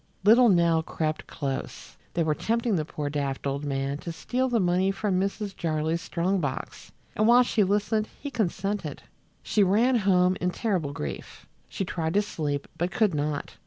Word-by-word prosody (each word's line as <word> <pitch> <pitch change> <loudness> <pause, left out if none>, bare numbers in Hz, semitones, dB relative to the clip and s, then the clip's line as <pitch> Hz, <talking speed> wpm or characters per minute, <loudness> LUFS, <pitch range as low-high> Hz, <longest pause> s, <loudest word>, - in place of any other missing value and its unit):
Little 230 +4 +7
Nell 170 -3 +4
crept 155 -1 -3
close. 135 -3 -5 0.2
They 170 - +2
were 155 -1 +1
tempting 230 +5 0
the 155 -3 -1
poor 150 -1 -4
daft 140 -2 -3
old 140 +1 -2
man 140 0 -2
to 170 - -5
steal 245 - -1
the 240 -2 +2
money 180 0 +2
from 195 -1 0
Mrs. 200 0 -3
Jarley's 160 0 -1
strong 185 +4 0
box, 145 -5 -5 0.2
and 215 - +2
while 245 +1 +7
she 225 -3 +2
listened 210 +2 0
he 285 - -6
consented. 195 - -2 0.4
She 210 - +1
ran 225 +7 +4
home 185 -3 +3
in 180 - +1
terrible 180 -7 -1
grief. 75 - -7 0.2
She 195 - -3
tried 165 -1 -2
to 205 - +4
sleep, 145 -7 -3
but 175 +2 +1
could 200 0 +2
not. 145 0 -3
180 Hz, 175 wpm, -27 LUFS, 155-210 Hz, 0.4 s, Little